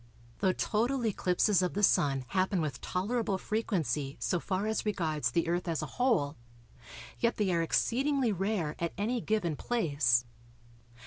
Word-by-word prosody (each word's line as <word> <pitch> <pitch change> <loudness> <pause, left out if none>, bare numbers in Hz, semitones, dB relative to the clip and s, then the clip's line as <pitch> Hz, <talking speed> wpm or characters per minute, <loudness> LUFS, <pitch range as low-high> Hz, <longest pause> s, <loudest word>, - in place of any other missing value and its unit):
Though 190 - +3
total 235 +6 0
eclipses 190 -1 +2
of 180 0 -1
the 205 - -1
Sun 135 -8 +3
happen 190 0 +1
with 150 -5 -3
tolerable 200 +2 -1
frequency 160 - -2
so 180 - 0
far 190 +3 -2
as 220 0 -1
regards 155 - 0
the 165 +7 0
Earth 175 +1 -1
as 165 -2 -1
a - - -7
whole, 180 - +2 0.8
yet 235 0 +1
they 195 -4 +1
are 170 - +2
exceedingly 260 - +1
rare 195 -5 -1
at 170 -1 -2
any 230 +4 -1
given 200 -8 0
place. 145 - +1
185 Hz, 150 wpm, -31 LUFS, 160-220 Hz, 0.8 s, Though